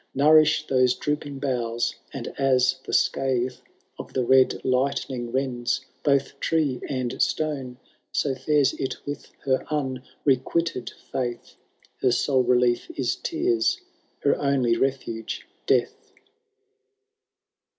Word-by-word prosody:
171 155 Hz, +2 st, +5 dB
Kouriflh -, -, -27 dB, 0.2 s
thoee 125 Hz, -, -1 dB
drooping 145 Hz, -2 st, -2 dB
boughfl, 120 Hz, -4 st, -1 dB, 0.2 s
and -, -, -6 dB
as 130 Hz, -2 st, +2 dB
the -, -, -6 dB
scathe 130 Hz, -1 st, +1 dB, 0.5 s
Of -, -, -8 dB
the 130 Hz, -, +1 dB
red 130 Hz, +1 st, +4 dB
lightning 130 Hz, -2 st, 0 dB
lends 125 Hz, -2 st, -1 dB, 0.2 s
both 140 Hz, -2 st, +1 dB
tree 145 Hz, -6 st, 0 dB
and 130 Hz, -3 st, -2 dB
stone. 135 Hz, -5 st, -1 dB, 0.3 s
So 140 Hz, -, 0 dB
fines 140 Hz, +2 st, +2 dB
it 135 Hz, -, -2 dB
with 145 Hz, 0 st, -5 dB, 0.2 s
her 130 Hz, -1 st, +2 dB
unrequited 135 Hz, 0 st, -1 dB, 0.2 s
fiiith^^ 125 Hz, -3 st, -3 dB, 0.5 s
Her 130 Hz, -, +3 dB
sole 130 Hz, +2 st, +2 dB
relief 125 Hz, -1 st, +2 dB
is 125 Hz, -3 st, 0 dB
tears— 355 Hz, +4 st, 0 dB, 0.4 s
her 140 Hz, -, +4 dB
only 135 Hz, -4 st, +2 dB
refnge 115 Hz, -3 st, -2 dB, 0.2 s
death. -, -, 0 dB
130 Hz, 115 wpm, -25 LUFS, 125-145 Hz, 0.5 s, 171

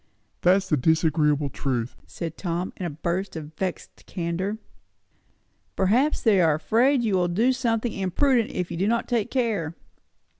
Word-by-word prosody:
"That's 190 Hz, +2 st, +3 dB
the 155 Hz, -, +2 dB
disagreeable 150 Hz, -1 st, +2 dB
truth!" 125 Hz, -4 st, -2 dB
said 165 Hz, -1 st, -6 dB
Tom 175 Hz, 0 st, -3 dB
in 180 Hz, -, -3 dB
a -, -, -3 dB
burst 170 Hz, +6 st, -3 dB
of 155 Hz, -1 st, -7 dB
vexed 180 Hz, +2 st, -5 dB
candour. 185 Hz, +4 st, -3 dB, 1.2 s
"Perhaps 240 Hz, +11 st, +2 dB
they 205 Hz, -5 st, +4 dB
are 160 Hz, -3 st, +4 dB
afraid 240 Hz, -, +2 dB
you 215 Hz, -3 st, 0 dB
will 180 Hz, -1 st, +2 dB
do 225 Hz, +9 st, +2 dB
something 235 Hz, -3 st, -1 dB
imprudent 230 Hz, +6 st, +1 dB
if 180 Hz, -1 st, -3 dB
they -, -, -5 dB
do 190 Hz, +4 st, +1 dB
not 235 Hz, +1 st, 0 dB
take 230 Hz, -4 st, 0 dB
care." 210 Hz, -11 st, -1 dB
185 Hz, 155 wpm, -25 LUFS, 165-225 Hz, 1.2 s, they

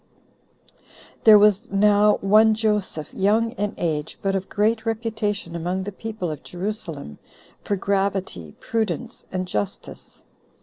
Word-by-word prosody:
2. -, -, -39 dB, 0.5 s
There 215 Hz, -1 st, +10 dB
was 210 Hz, +3 st, +3 dB
now 205 Hz, +1 st, +4 dB
one 215 Hz, +2 st, +5 dB
Joseph, 210 Hz, -8 st, -1 dB
young 220 Hz, +4 st, +2 dB
in 205 Hz, -3 st, -3 dB
age, 155 Hz, -3 st, -2 dB
but 195 Hz, -1 st, +1 dB
of 190 Hz, 0 st, -3 dB
great 220 Hz, +2 st, +1 dB
reputation 220 Hz, -5 st, -2 dB
among 180 Hz, +3 st, -2 dB
the 205 Hz, -, -5 dB
people 210 Hz, -4 st, -5 dB
of 150 Hz, -, -7 dB
Jerusalem, 175 Hz, -, -5 dB, 0.4 s
for 205 Hz, -, -1 dB
gravity, 195 Hz, -, -2 dB
prudence, 225 Hz, +2 st, -3 dB
and 185 Hz, 0 st, -3 dB
justice. 105 Hz, -, -5 dB
205 Hz, 130 wpm, -23 LUFS, 180-220 Hz, 0.5 s, There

